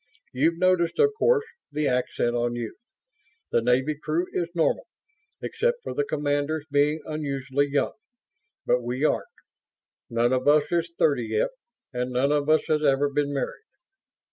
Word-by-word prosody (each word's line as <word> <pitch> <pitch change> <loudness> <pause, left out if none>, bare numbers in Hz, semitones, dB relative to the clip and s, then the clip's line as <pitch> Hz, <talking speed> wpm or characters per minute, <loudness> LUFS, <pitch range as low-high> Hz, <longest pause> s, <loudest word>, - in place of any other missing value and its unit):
You've 160 +6 +2
noticed, 185 -1 +2
of 435 -1 +4
course, 455 -1 +3 0.3
the 150 +1 -1
accent 125 -1 0
on 120 0 0
youth. 120 - -7 0.6
The 120 - +3
Navy 130 +5 +2
crew 155 +4 -1
is 170 -2 -1
normal, 165 - +1 0.6
except 485 0 -1
for - - -4
the 440 - 0
commanders 145 - -1
being 145 +2 +2
unusually 140 -2 -1
young. 140 0 0 0.7
But 125 - +2
we 125 +4 -1
aren't. - - +1 0.8
None 120 +2 +2
of 130 +1 0
us 150 0 +6
is 170 -1 0
thirty 135 -7 +2
yet, 110 0 +1 0.4
and 125 0 -2
none 130 +3 +1
of 150 0 +1
us 155 0 +4
has 155 -1 +1
ever 140 0 +3
been 145 0 0
married. 140 - -3
145 Hz, 155 wpm, -25 LUFS, 130-160 Hz, 0.8 s, us